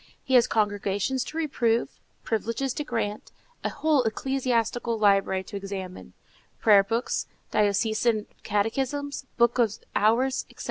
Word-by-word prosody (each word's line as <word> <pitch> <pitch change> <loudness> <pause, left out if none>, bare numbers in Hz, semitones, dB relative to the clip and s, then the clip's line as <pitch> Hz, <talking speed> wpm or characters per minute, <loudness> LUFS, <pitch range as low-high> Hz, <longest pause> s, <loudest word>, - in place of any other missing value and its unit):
He 265 - -3
has 245 -2 +6
congregations 205 +3 0
to 315 - -7
reprove, 240 -7 0 0.2
privileges 230 +4 -1
to 295 - -3
grant, 225 -6 -3 0.3
a - - 0
whole 300 -1 +2
ecclesiastical 240 -1 -1
library 195 -2 +3
to 200 - -7
examine,—prayer 195 +1 -1
books, 230 +4 -2 0.2
diocesan 215 +1 +1 0.2
catechisms, 265 +7 -2
books 240 +1 +3
of 220 -3 +2 0.2
hours, 240 +5 +2
etc. - - -19
230 Hz, 120 wpm, -26 LUFS, 205-260 Hz, 0.3 s, has